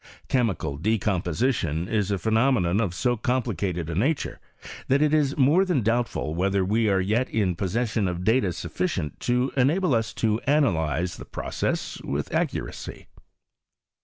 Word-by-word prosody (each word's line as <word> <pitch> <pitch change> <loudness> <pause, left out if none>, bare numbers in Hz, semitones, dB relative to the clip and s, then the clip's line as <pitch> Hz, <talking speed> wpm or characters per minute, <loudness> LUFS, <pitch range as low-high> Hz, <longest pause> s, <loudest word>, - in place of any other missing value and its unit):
Chemical 95 - 0
decomposition 100 - 0
is 105 -2 0
a 100 - 0
phenomenon 110 -3 +2
of 95 -6 -2
so 120 +4 +1
complicated 105 -8 -1
a 85 - -4
nature, 135 - -1 0.5
that 135 +2 +3
it 150 0 +2
is 145 -3 +2
more 150 +7 +5
than 175 - 0
doubtful 115 -8 0
whether 95 +2 +1
we 110 +3 +2
are 95 -1 +3
yet 110 +7 0
in 95 -5 0
pos 95 +2 -3
session 115 -3 0
of 90 0 -3
data 110 -2 +2
sufficient 75 -3 -3
to 125 +2 0
enable 145 +5 +2
us 115 -1 0
to 110 -1 +1
analyze 90 - +1
the - - -9
process - - -3
with - - -3
accuracy. - - -3
110 Hz, 150 wpm, -25 LUFS, 90-130 Hz, 0.5 s, more